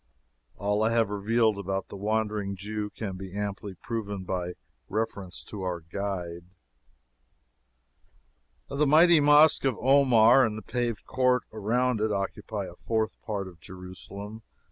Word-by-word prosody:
All 105 Hz, +1 st, 0 dB
I 110 Hz, -, +3 dB
have 115 Hz, -3 st, +2 dB
revealed 110 Hz, +1 st, +1 dB
about 95 Hz, 0 st, -3 dB
the -, -, -7 dB
Wandering 105 Hz, -1 st, -1 dB
Jew 105 Hz, +2 st, -4 dB
can 100 Hz, -3 st, -6 dB
be 95 Hz, +1 st, -8 dB
amply 100 Hz, -1 st, -4 dB
proven 105 Hz, -2 st, -4 dB
by 90 Hz, -1 st, -3 dB, 0.4 s
reference 100 Hz, -3 st, -3 dB
to 105 Hz, -, -8 dB
our 90 Hz, -2 st, -2 dB
guide. 85 Hz, -1 st, -5 dB, 2.2 s
The 150 Hz, +1 st, +1 dB
mighty 165 Hz, +3 st, +7 dB
Mosque 150 Hz, +1 st, +6 dB
of 135 Hz, -5 st, +1 dB
Omar, 130 Hz, -2 st, +6 dB
and 110 Hz, -3 st, 0 dB
the 110 Hz, -, -8 dB
paved 120 Hz, -3 st, -2 dB
court 125 Hz, -2 st, +2 dB
around 115 Hz, +2 st, 0 dB
it, 110 Hz, 0 st, +1 dB
occupy 100 Hz, +1 st, -3 dB
a 85 Hz, -, -9 dB
fourth 110 Hz, +3 st, -2 dB
part 100 Hz, -4 st, -4 dB
of 90 Hz, -3 st, -13 dB
Jerusalem. 95 Hz, +4 st, -9 dB
105 Hz, 140 wpm, -27 LUFS, 95-115 Hz, 2.2 s, mighty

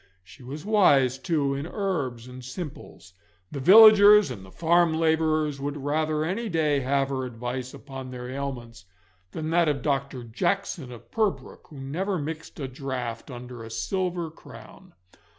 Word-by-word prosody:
She 90 Hz, +9 st, -17 dB
was 140 Hz, +7 st, -8 dB
wise, 140 Hz, -, +4 dB
too, 145 Hz, -3 st, 0 dB
in 140 Hz, +3 st, -4 dB
herbs 145 Hz, -, -3 dB
and 125 Hz, 0 st, -10 dB
simples. 130 Hz, -, -9 dB, 0.4 s
The 140 Hz, -, -5 dB
villagers 210 Hz, +1 st, +8 dB
and 100 Hz, -6 st, -8 dB
the 95 Hz, -, -13 dB
farm 170 Hz, -, +2 dB
labourers 155 Hz, -3 st, +1 dB
would 145 Hz, +1 st, -3 dB
rather 155 Hz, +2 st, -1 dB
any 210 Hz, +7 st, -2 dB
day 155 Hz, -5 st, +1 dB
have 135 Hz, +1 st, 0 dB
her 130 Hz, -1 st, -2 dB
advice 125 Hz, +1 st, -5 dB
upon 135 Hz, -2 st, -9 dB
their 125 Hz, -1 st, -7 dB
ailments 125 Hz, -5 st, -6 dB, 0.5 s
than 155 Hz, 0 st, -4 dB
that 170 Hz, -1 st, +3 dB
of 140 Hz, -4 st, -2 dB
Dr. 135 Hz, -3 st, -2 dB
Jackson 170 Hz, -, -2 dB
of 120 Hz, -, -13 dB
Purbrook, 215 Hz, -3 st, -2 dB
who 145 Hz, -, -12 dB
never 180 Hz, +9 st, -2 dB
mixed 160 Hz, +1 st, -6 dB
a 135 Hz, -, -3 dB
draught 130 Hz, -3 st, -5 dB
under 125 Hz, -2 st, -9 dB
a 110 Hz, -, -9 dB
silver 175 Hz, -, -2 dB
crown. -, -, -15 dB
140 Hz, 155 wpm, -26 LUFS, 130-165 Hz, 0.5 s, villagers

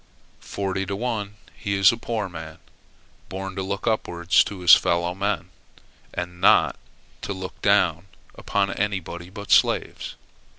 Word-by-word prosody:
Forty 95 Hz, -1 st, -3 dB
to 100 Hz, -, -2 dB
one 105 Hz, -2 st, -3 dB, 0.2 s
he 100 Hz, -3 st, -2 dB
is 95 Hz, -1 st, +6 dB
a -, -, -3 dB
poor 115 Hz, -3 st, -3 dB
man, 80 Hz, -3 st, -9 dB, 0.7 s
born 95 Hz, 0 st, -5 dB
to 95 Hz, -, -2 dB
look 100 Hz, +1 st, -4 dB
upwards 90 Hz, -5 st, +2 dB
to 100 Hz, -3 st, -7 dB
his 90 Hz, -, +8 dB
fellow 85 Hz, +1 st, +3 dB
men 100 Hz, +3 st, -2 dB, 0.6 s
and 90 Hz, 0 st, -6 dB
not 95 Hz, -, +5 dB, 0.5 s
to 100 Hz, -, -3 dB
look 95 Hz, -1 st, -8 dB
down 95 Hz, -3 st, +2 dB, 0.3 s
upon 100 Hz, -1 st, -1 dB
anybody 90 Hz, -4 st, -3 dB
but 100 Hz, +1 st, -8 dB
slaves. -, -, +2 dB
95 Hz, 140 wpm, -24 LUFS, 90-100 Hz, 0.7 s, his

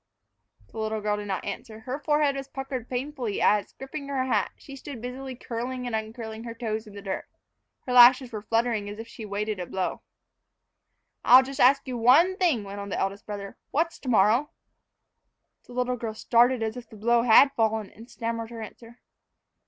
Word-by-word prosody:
The 225 Hz, -, -8 dB
little 220 Hz, 0 st, -1 dB
girl 210 Hz, 0 st, -1 dB
did 205 Hz, 0 st, -6 dB
not 190 Hz, -1 st, -3 dB
answer. 215 Hz, +2 st, -7 dB
Her 255 Hz, +3 st, -4 dB
forehead 295 Hz, -1 st, +2 dB
was 275 Hz, 0 st, -5 dB
puckered 270 Hz, -3 st, -6 dB
painfully 255 Hz, -4 st, -3 dB
as, 210 Hz, -1 st, +2 dB
gripping 280 Hz, +2 st, -7 dB
her 270 Hz, -2 st, -1 dB
hat, 260 Hz, -, +1 dB
she 275 Hz, -, -11 dB
stood 275 Hz, -2 st, -8 dB
busily 255 Hz, +2 st, -6 dB
curling 250 Hz, +1 st, -5 dB
and 240 Hz, -2 st, -2 dB
uncurling 220 Hz, 0 st, -5 dB
her 230 Hz, -1 st, -7 dB
toes 220 Hz, -2 st, -3 dB
in 205 Hz, -, -12 dB
the 200 Hz, -, -9 dB
dirt. 195 Hz, -1 st, -4 dB, 0.6 s
Her 250 Hz, -, -2 dB
lashes 250 Hz, +1 st, +7 dB
were 215 Hz, -2 st, -5 dB
fluttering 225 Hz, -1 st, 0 dB
as 205 Hz, -, -7 dB
if 225 Hz, +1 st, -8 dB
she -, -, -12 dB
awaited 210 Hz, 0 st, -3 dB
a 180 Hz, -, -4 dB
blow. 190 Hz, +1 st, -3 dB, 1.2 s
"I'll 255 Hz, +1 st, +8 dB
just 270 Hz, +1 st, -7 dB
ask 275 Hz, +2 st, +5 dB
you 250 Hz, -2 st, -3 dB
one 300 Hz, +11 st, +5 dB
thing," 325 Hz, -, +2 dB
went 200 Hz, 0 st, -7 dB
on 200 Hz, 0 st, -6 dB
the -, -, -3 dB
eldest 200 Hz, +1 st, -3 dB
brother; 200 Hz, -1 st, -6 dB
"what's 330 Hz, +3 st, -1 dB
to 260 Hz, -, -6 dB
morrow?" 225 Hz, +6 st, +4 dB, 1.2 s
The 245 Hz, -, -12 dB
little 250 Hz, 0 st, -1 dB
girl 225 Hz, -2 st, -5 dB
started 240 Hz, +2 st, +3 dB
as 220 Hz, 0 st, -2 dB
if 245 Hz, -2 st, -9 dB
the -, -, -13 dB
blow 235 Hz, +3 st, +3 dB
had 245 Hz, +4 st, +7 dB
fallen, 220 Hz, -2 st, 0 dB
and 230 Hz, +3 st, -14 dB
stammered 230 Hz, -1 st, -4 dB
her 230 Hz, -2 st, -7 dB
answer. 230 Hz, +2 st, -12 dB
235 Hz, 195 wpm, -26 LUFS, 215-260 Hz, 1.2 s, I'll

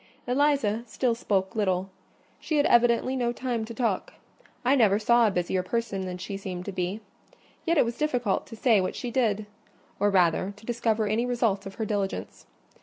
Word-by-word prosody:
Eliza 255 Hz, -4 st, +2 dB
still 245 Hz, +1 st, 0 dB
spoke 195 Hz, -4 st, -1 dB
little: 190 Hz, -3 st, 0 dB, 0.5 s
she 310 Hz, -, -1 dB
had 290 Hz, -, +3 dB
evidently 240 Hz, +2 st, +3 dB
no 240 Hz, -2 st, 0 dB
time 240 Hz, -2 st, -2 dB
to 225 Hz, -, -9 dB
talk. 225 Hz, -6 st, -1 dB, 0.5 s
I 265 Hz, +3 st, +5 dB
never 215 Hz, -6 st, +4 dB
saw 235 Hz, +2 st, +4 dB
a -, -, +3 dB
busier 185 Hz, -1 st, 0 dB
person 195 Hz, -1 st, -2 dB
than 180 Hz, 0 st, -5 dB
she 195 Hz, +2 st, -5 dB
seemed 185 Hz, -2 st, -6 dB
to 200 Hz, -, -4 dB
be; 185 Hz, +3 st, -3 dB, 0.7 s
yet 335 Hz, 0 st, +3 dB
it -, -, +5 dB
was 235 Hz, 0 st, -4 dB
difficult 245 Hz, -9 st, 0 dB
to 225 Hz, -, -9 dB
say 220 Hz, -3 st, +3 dB
what 185 Hz, -, -2 dB
she 245 Hz, -, -4 dB
did: 215 Hz, -5 st, +1 dB, 0.5 s
or 205 Hz, -, +3 dB
rather, 185 Hz, +1 st, +2 dB
to 215 Hz, -, -16 dB
discover 225 Hz, -2 st, 0 dB
any 220 Hz, +4 st, 0 dB
result 225 Hz, -5 st, 0 dB
of 195 Hz, -, -9 dB
her 220 Hz, -, -2 dB
diligence. 200 Hz, -2 st, -3 dB
220 Hz, 185 wpm, -27 LUFS, 195-240 Hz, 0.7 s, I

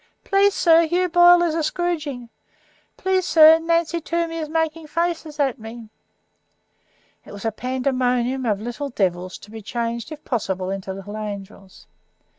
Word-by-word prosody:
"Please, 400 Hz, 0 st, +3 dB
sir, 330 Hz, -1 st, +5 dB
Hugh 360 Hz, +2 st, +1 dB
Boyle 350 Hz, 0 st, +6 dB
is 335 Hz, -2 st, 0 dB
a 330 Hz, -, -1 dB
scroodgin." 300 Hz, -7 st, -3 dB, 0.7 s
"Please, 375 Hz, 0 st, 0 dB
sir, 320 Hz, -1 st, +7 dB
Nancy 335 Hz, 0 st, 0 dB
Toomey 335 Hz, 0 st, -2 dB
is 310 Hz, -2 st, -4 dB
making 320 Hz, 0 st, -2 dB
faces 330 Hz, -2 st, -3 dB
at 270 Hz, -3 st, 0 dB
me." 225 Hz, 0 st, -10 dB, 1.3 s
It -, -, -14 dB
was 205 Hz, +1 st, -9 dB
a 225 Hz, -, +1 dB
pandemonium 255 Hz, +1 st, -1 dB
of 205 Hz, -3 st, 0 dB
little 240 Hz, +6 st, -5 dB
devils, 185 Hz, -5 st, -2 dB
to 210 Hz, -, -15 dB
be 220 Hz, 0 st, -8 dB
changed, 235 Hz, +4 st, -4 dB
if 305 Hz, -1 st, -10 dB
possible, 190 Hz, -6 st, -2 dB
into 195 Hz, -1 st, -5 dB
little 195 Hz, +2 st, -8 dB
angels. 200 Hz, -2 st, -8 dB
275 Hz, 150 wpm, -22 LUFS, 220-330 Hz, 1.3 s, sir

